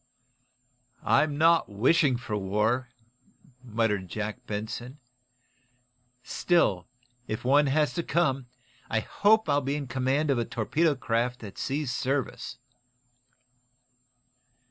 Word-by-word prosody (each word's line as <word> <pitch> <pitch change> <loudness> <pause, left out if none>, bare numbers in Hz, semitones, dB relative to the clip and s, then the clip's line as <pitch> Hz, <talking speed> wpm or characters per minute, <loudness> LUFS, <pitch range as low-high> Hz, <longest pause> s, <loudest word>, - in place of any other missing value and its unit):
"I'm 145 -2 +3
not 165 -1 +4
wishing 130 - +3
for 120 -3 -5
war," 105 +6 0 0.7
muttered 110 -5 -1
Jack 110 +3 -5
Benson. 110 +5 -5 1.3
"Still, 105 - +1 0.4
if 110 +2 -4
one 145 +3 +4
has 145 -1 +2
to 170 - -1
come, 140 -7 0 0.4
I 110 - +1
hope 215 - +3
I'll 145 -1 +2
be 140 +2 -2
in 145 -1 -3
command 135 +4 0
of 130 - +1
a - - +1
torpedo 150 +9 0
craft 125 0 -1
that 100 -4 -9
sees 140 -1 -2
service." 135 +2 -2
130 Hz, 110 wpm, -27 LUFS, 110-145 Hz, 1.3 s, not